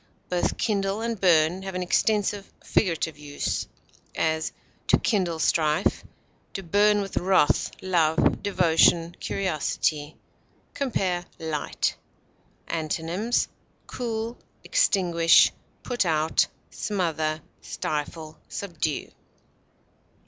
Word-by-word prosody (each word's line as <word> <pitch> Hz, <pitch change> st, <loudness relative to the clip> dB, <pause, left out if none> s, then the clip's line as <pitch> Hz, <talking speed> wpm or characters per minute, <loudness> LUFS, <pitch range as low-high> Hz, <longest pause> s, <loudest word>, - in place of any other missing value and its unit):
Both 180 Hz, -1 st, 0 dB
kindle 200 Hz, -1 st, 0 dB
and 230 Hz, -3 st, -3 dB
burn 170 Hz, 0 st, +4 dB
have 190 Hz, -1 st, -6 dB
an 185 Hz, -, -1 dB
extensive 205 Hz, +1 st, +1 dB
figurative 160 Hz, -5 st, 0 dB
use; 145 Hz, -1 st, -3 dB, 0.5 s
as, 160 Hz, 0 st, 0 dB, 0.4 s
to -, -, +5 dB
kindle 185 Hz, -7 st, 0 dB
strife; 155 Hz, -1 st, +1 dB, 0.5 s
to 195 Hz, -, -4 dB
burn 205 Hz, +4 st, +3 dB
with 195 Hz, -1 st, -5 dB
wrath, 185 Hz, -4 st, +3 dB
love, 165 Hz, -4 st, +2 dB
devotion, 170 Hz, -3 st, +3 dB
curiosity. 155 Hz, -4 st, -1 dB, 0.6 s
Compare 185 Hz, -10 st, -1 dB
LIGHT. 160 Hz, -2 st, -2 dB, 0.7 s
Antonyms: 165 Hz, +8 st, -1 dB, 0.4 s
cool, 230 Hz, -1 st, -4 dB, 0.2 s
extinguish, 175 Hz, -, +4 dB, 0.3 s
put 245 Hz, -3 st, 0 dB
out, 160 Hz, -2 st, +2 dB, 0.2 s
smother, 160 Hz, -6 st, -1 dB, 0.2 s
stifle, 155 Hz, +1 st, -4 dB
subdue. 165 Hz, -6 st, -3 dB
175 Hz, 90 wpm, -26 LUFS, 160-200 Hz, 0.7 s, to